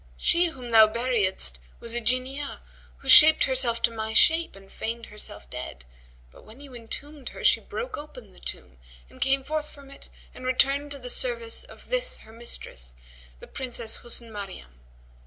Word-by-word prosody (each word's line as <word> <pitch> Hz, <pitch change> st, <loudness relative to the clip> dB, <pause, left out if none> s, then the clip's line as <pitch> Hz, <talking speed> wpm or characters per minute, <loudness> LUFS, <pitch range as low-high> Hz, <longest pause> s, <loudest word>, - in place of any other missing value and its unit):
She 345 Hz, -, +3 dB
whom 255 Hz, -7 st, -8 dB
thou 220 Hz, -1 st, +8 dB
buriedst 215 Hz, -, 0 dB, 0.2 s
was 230 Hz, -, -7 dB
a 240 Hz, -, 0 dB
Jinniyah, 255 Hz, +4 st, -1 dB, 0.4 s
who 275 Hz, -, -13 dB
shaped 305 Hz, +4 st, +9 dB
herself 250 Hz, -3 st, 0 dB
to 230 Hz, -, +3 dB
my 220 Hz, -1 st, -4 dB
shape 325 Hz, +1 st, +4 dB
and 195 Hz, 0 st, -16 dB
feigned 230 Hz, +1 st, -5 dB
herself 210 Hz, -, -9 dB
dead; -, -, -8 dB, 0.5 s
but -, -, -17 dB
when 220 Hz, +4 st, -15 dB
you 280 Hz, -2 st, -12 dB
entombed 260 Hz, +4 st, -8 dB
her -, -, -10 dB
she -, -, +5 dB
broke 485 Hz, +1 st, -6 dB
open 250 Hz, -9 st, -12 dB
the -, -, -18 dB
tomb 65 Hz, 0 st, -8 dB, 0.3 s
and -, -, -17 dB
came 270 Hz, 0 st, +2 dB
forth 305 Hz, +1 st, -3 dB
from 280 Hz, -1 st, -15 dB
it 275 Hz, -, -12 dB, 0.2 s
and -, -, -11 dB
returned 275 Hz, +3 st, +2 dB
to -, -, -6 dB
the 250 Hz, -2 st, -5 dB
service 475 Hz, -2 st, -1 dB
of -, -, -16 dB
this -, -, +1 dB
her 220 Hz, -, -15 dB
mistress, 65 Hz, -, -6 dB, 0.4 s
the -, -, -11 dB
Princess 240 Hz, -4 st, +1 dB
Husn 235 Hz, -1 st, -2 dB
Maryam. 190 Hz, -, -9 dB
245 Hz, 175 wpm, -26 LUFS, 220-280 Hz, 0.5 s, shaped